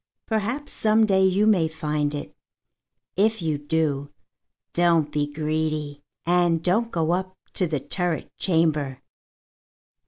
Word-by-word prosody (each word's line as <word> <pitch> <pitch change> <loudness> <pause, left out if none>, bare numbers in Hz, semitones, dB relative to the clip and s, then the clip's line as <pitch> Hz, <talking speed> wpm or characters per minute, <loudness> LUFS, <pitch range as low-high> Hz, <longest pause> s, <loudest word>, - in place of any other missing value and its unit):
Perhaps 230 +7 -2
some 220 0 +3
day 190 -2 +3
you 190 +2 +3
may 190 -7 +4
find 150 -2 -2
it. 145 - -7 0.8
If 220 +3 +2
you 155 -4 -1
do, 145 -2 -1 0.6
don't 170 -3 +3
be 145 -1 -1
greedy, 155 -1 -2 0.2
and 175 -1 +2
don't 220 +7 +2
go 165 -1 0
up 185 +1 -2 0.2
to 185 - 0
the 155 -3 -1
turret 170 +4 -3
chamber. 155 -6 +1
165 Hz, 125 wpm, -24 LUFS, 150-190 Hz, 0.8 s, may